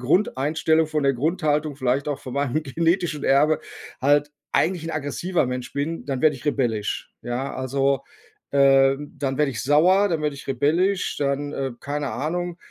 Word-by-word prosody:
Grundeinstellung 160 Hz, +1 st, +2 dB
von 155 Hz, -1 st, -1 dB
der 135 Hz, -1 st, +3 dB
Grundhaltung 150 Hz, 0 st, 0 dB
vielleicht 130 Hz, +1 st, 0 dB
auch 145 Hz, -1 st, -2 dB
von 130 Hz, -1 st, -8 dB
meinem 140 Hz, +2 st, 0 dB
genetischen 165 Hz, +1 st, 0 dB
Erbe 150 Hz, +3 st, +4 dB, 0.4 s
halt 145 Hz, +2 st, +3 dB, 0.2 s
eigentlich 170 Hz, -2 st, +1 dB
ein 165 Hz, -, -3 dB
aggressiver 155 Hz, +2 st, -1 dB
Mensch 125 Hz, 0 st, -4 dB
bin, 150 Hz, +4 st, -3 dB
dann 135 Hz, -3 st, -2 dB
werde 150 Hz, -3 st, +4 dB
ich 120 Hz, -, -14 dB
rebellisch, 120 Hz, -8 st, -1 dB
ja? 125 Hz, +3 st, -3 dB
Also, 135 Hz, +1 st, 0 dB, 0.5 s
ähm, 135 Hz, +1 st, +3 dB
dann 135 Hz, -2 st, -1 dB
werde 150 Hz, -2 st, +2 dB
ich 115 Hz, -, -4 dB
sauer, 180 Hz, +8 st, +4 dB
dann 160 Hz, -3 st, -1 dB
werde 150 Hz, -2 st, -1 dB
ich -, -, -11 dB
rebellisch, 165 Hz, +9 st, +1 dB
dann, 145 Hz, +1 st, -1 dB
äh, 135 Hz, -2 st, -3 dB
keine 145 Hz, -1 st, -3 dB
Ahnung. 175 Hz, +4 st, -3 dB
145 Hz, 165 wpm, -23 LUFS, 135-155 Hz, 0.5 s, Erbe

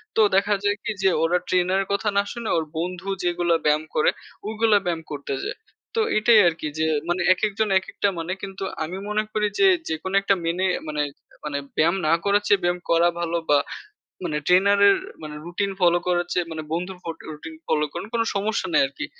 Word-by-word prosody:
তো -, -, +4 dB
দেখা 205 Hz, +2 st, +3 dB
যায় 205 Hz, 0 st, +1 dB
কি -, -, -2 dB
যে 190 Hz, -, +5 dB
ওরা 170 Hz, +2 st, +3 dB
ট্রেনার 185 Hz, +1 st, +2 dB
এর 195 Hz, -, -5 dB
কথা 200 Hz, +1 st, 0 dB
না 200 Hz, -, +4 dB
শুনে 235 Hz, -2 st, -5 dB
ওর 160 Hz, -, 0 dB
বন্ধু 180 Hz, +2 st, -4 dB, 0.2 s
যেগুলো 175 Hz, -1 st, +1 dB
ব্যায়াম 150 Hz, +1 st, +3 dB
করে 155 Hz, -, +4 dB, 0.4 s
ওগুলা 220 Hz, -1 st, +3 dB
ব্যায়াম 170 Hz, -2 st, -1 dB
করতে 140 Hz, -1 st, -4 dB
যায়। -, -, -4 dB, 0.4 s
তো 455 Hz, -, +3 dB, 0.2 s
এটাই 220 Hz, +1 st, +6 dB
আরকি 165 Hz, -2 st, -1 dB
যে 160 Hz, -, +2 dB, 0.2 s
মানে 175 Hz, +1 st, 0 dB
একেকজন 210 Hz, +2 st, -1 dB
একেকটা 190 Hz, +1 st, -2 dB
মানে 165 Hz, +2 st, -4 dB
কিন্তু 195 Hz, 0 st, -6 dB, 0.2 s
আমি 175 Hz, +4 st, -5 dB
মনে 210 Hz, 0 st, +1 dB
করি 210 Hz, -1 st, +1 dB
যে 390 Hz, -, +6 dB, 0.2 s
যেকোন 160 Hz, +4 st, -3 dB
একটা 195 Hz, 0 st, +2 dB
মেনে 175 Hz, +3 st, 0 dB, 0.2 s
মানে 150 Hz, -1 st, -1 dB, 0.4 s
মানে 145 Hz, -1 st, -2 dB, 0.2 s
ব্যায়াম 170 Hz, +3 st, +3 dB
না 155 Hz, -, +4 dB
করার 205 Hz, 0 st, +3 dB
চেয়ে 200 Hz, -1 st, +4 dB
ব্যায়াম 175 Hz, 0 st, +1 dB
করা 170 Hz, +1 st, +4 dB
ভালো 170 Hz, 0 st, -1 dB
বা 145 Hz, -, +6 dB, 0.7 s
মানে 155 Hz, -4 st, -1 dB
ট্রেনারের 200 Hz, +2 st, +5 dB, 0.2 s
মানে 150 Hz, -1 st, -7 dB
রুটিন 195 Hz, +3 st, -2 dB
ফলো 175 Hz, -1 st, +4 dB
করার 175 Hz, -1 st, +1 dB
চেয়ে 175 Hz, -2 st, -1 dB
মানে 160 Hz, -1 st, -5 dB
বন্ধুর 180 Hz, +3 st, -3 dB
ফট 165 Hz, -1 st, -5 dB
রুটিন 160 Hz, +1 st, -9 dB
ফলো 150 Hz, -1 st, +2 dB
করেন -, -, -5 dB
কোন 230 Hz, -, +1 dB
সমস্যা 200 Hz, -1 st, -1 dB
নাই -, -, +5 dB
আরকি। 135 Hz, -, -6 dB
180 Hz, 195 wpm, -23 LUFS, 165-200 Hz, 0.7 s, এটাই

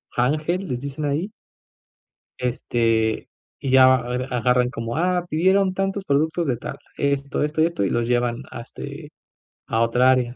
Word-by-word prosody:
ángel, 155 Hz, +9 st, 0 dB
les 125 Hz, -, -2 dB
dicen 140 Hz, +3 st, -5 dB
ahí 150 Hz, +7 st, -1 dB, 1.1 s
este, 115 Hz, -3 st, 0 dB, 0.3 s
y 135 Hz, -, -2 dB
ya 130 Hz, 0 st, +7 dB
a -, -, +5 dB, 0.2 s
a 125 Hz, 0 st, -2 dB
agarran 125 Hz, +1 st, +2 dB
como: 115 Hz, 0 st, -4 dB
"Ah, 180 Hz, +1 st, +1 dB
pidieron 190 Hz, +4 st, +2 dB
tantos 195 Hz, +1 st, -2 dB
productos 160 Hz, +3 st, +1 dB
de 125 Hz, -4 st, 0 dB
tal, -, -, -6 dB, 0.2 s
esto, 140 Hz, 0 st, -1 dB
esto 150 Hz, +1 st, -1 dB
y -, -, +5 dB
esto", 170 Hz, -11 st, -1 dB
y 95 Hz, -, 0 dB
los 120 Hz, 0 st, 0 dB
llevan 120 Hz, 0 st, 0 dB
a, -, -, -7 dB
este, -, -, -9 dB, 0.6 s
a 115 Hz, -, 0 dB
otra 125 Hz, +2 st, +4 dB
área. 125 Hz, -1 st, +1 dB
130 Hz, 170 wpm, -23 LUFS, 120-160 Hz, 1.1 s, ya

